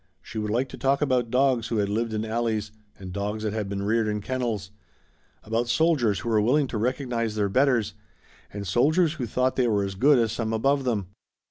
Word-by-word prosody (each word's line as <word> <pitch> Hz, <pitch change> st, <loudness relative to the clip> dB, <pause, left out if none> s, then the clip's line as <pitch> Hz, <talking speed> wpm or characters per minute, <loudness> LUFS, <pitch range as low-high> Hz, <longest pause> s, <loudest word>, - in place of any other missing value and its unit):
She 110 Hz, -, -6 dB
would 105 Hz, 0 st, -2 dB
like 120 Hz, +5 st, 0 dB
to -, -, -10 dB
talk 140 Hz, +2 st, +2 dB
about 125 Hz, -4 st, +1 dB
dogs 125 Hz, -2 st, +2 dB
who 115 Hz, -, -2 dB
had 100 Hz, -1 st, +1 dB
lived 110 Hz, +3 st, -1 dB
in 110 Hz, 0 st, -2 dB
alleys 110 Hz, -2 st, -1 dB, 0.3 s
and 95 Hz, -2 st, -8 dB
dogs 105 Hz, +2 st, -3 dB
that 105 Hz, -1 st, -1 dB
had 105 Hz, -3 st, -3 dB
been 100 Hz, 0 st, -3 dB
reared 110 Hz, +2 st, +1 dB
in 105 Hz, 0 st, -1 dB
kennels, 110 Hz, -4 st, -3 dB, 0.7 s
about 115 Hz, +2 st, -1 dB
soldiers 120 Hz, -, +2 dB
who 115 Hz, -, -4 dB
were 110 Hz, -2 st, +3 dB
willing 135 Hz, +7 st, +3 dB
to 115 Hz, -, -3 dB
recognize 120 Hz, -2 st, -1 dB
their 105 Hz, -2 st, 0 dB
betters 125 Hz, -1 st, +2 dB, 0.6 s
and 100 Hz, 0 st, -6 dB
soldiers 150 Hz, -, +2 dB
who 130 Hz, -7 st, -4 dB
thought 130 Hz, +3 st, 0 dB
they 125 Hz, -2 st, +3 dB
were 105 Hz, -3 st, +1 dB
as 100 Hz, 0 st, -3 dB
good 135 Hz, +9 st, +4 dB
as 115 Hz, -3 st, +2 dB
some 115 Hz, -1 st, -2 dB
above 135 Hz, +4 st, +1 dB
them. 105 Hz, -7 st, -1 dB
115 Hz, 215 wpm, -25 LUFS, 105-130 Hz, 0.7 s, good